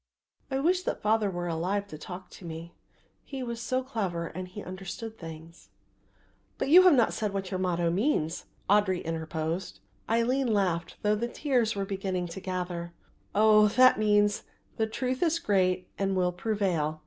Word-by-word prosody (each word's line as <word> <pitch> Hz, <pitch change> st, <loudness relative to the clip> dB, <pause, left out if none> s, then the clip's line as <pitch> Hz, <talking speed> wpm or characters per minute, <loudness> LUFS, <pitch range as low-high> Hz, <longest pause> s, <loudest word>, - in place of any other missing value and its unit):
I 265 Hz, -, -1 dB
wish 350 Hz, +6 st, +2 dB
that -, -, -3 dB
father 215 Hz, -1 st, +2 dB
were 175 Hz, -1 st, -3 dB
alive 180 Hz, +5 st, -1 dB
to 155 Hz, -, -8 dB
talk 180 Hz, +3 st, -9 dB
to -, -, -13 dB
me. 165 Hz, 0 st, -7 dB, 0.5 s
He 270 Hz, -2 st, -6 dB
was 235 Hz, -1 st, -4 dB
so 255 Hz, +2 st, -1 dB
clever 195 Hz, -10 st, -2 dB
and 185 Hz, +2 st, -6 dB
he 195 Hz, +3 st, -8 dB
understood 195 Hz, +4 st, -7 dB
things." 165 Hz, -2 st, -11 dB, 0.9 s
"But -, -, -1 dB
you 355 Hz, +5 st, +10 dB
have 365 Hz, -5 st, +7 dB
not 235 Hz, -4 st, +3 dB
said 210 Hz, -2 st, -2 dB
what 195 Hz, -1 st, -3 dB
your 185 Hz, -, -2 dB
motto 175 Hz, -2 st, +1 dB
means," 180 Hz, -, 0 dB, 0.2 s
Audry 195 Hz, -2 st, +3 dB
interposed. 160 Hz, +2 st, -3 dB, 0.3 s
Aline 240 Hz, +3 st, +2 dB
laughed 180 Hz, -5 st, 0 dB
through 210 Hz, 0 st, +3 dB
the 235 Hz, +3 st, -1 dB
tears 245 Hz, -4 st, +1 dB
that 200 Hz, -, -5 dB
were -, -, -1 dB
beginning 190 Hz, -2 st, -2 dB
to 165 Hz, -, -6 dB
gather, 180 Hz, -2 st, -4 dB, 0.4 s
"Oh, 215 Hz, 0 st, +6 dB
that 255 Hz, +2 st, +5 dB
means, 205 Hz, -1 st, +3 dB, 0.4 s
The 220 Hz, -, +1 dB
truth 255 Hz, +3 st, -2 dB
is 335 Hz, -1 st, +3 dB
great 185 Hz, -, +1 dB
and 195 Hz, -1 st, +1 dB
will 180 Hz, -1 st, +2 dB
prevail. 180 Hz, -6 st, -1 dB
195 Hz, 170 wpm, -28 LUFS, 175-225 Hz, 0.9 s, you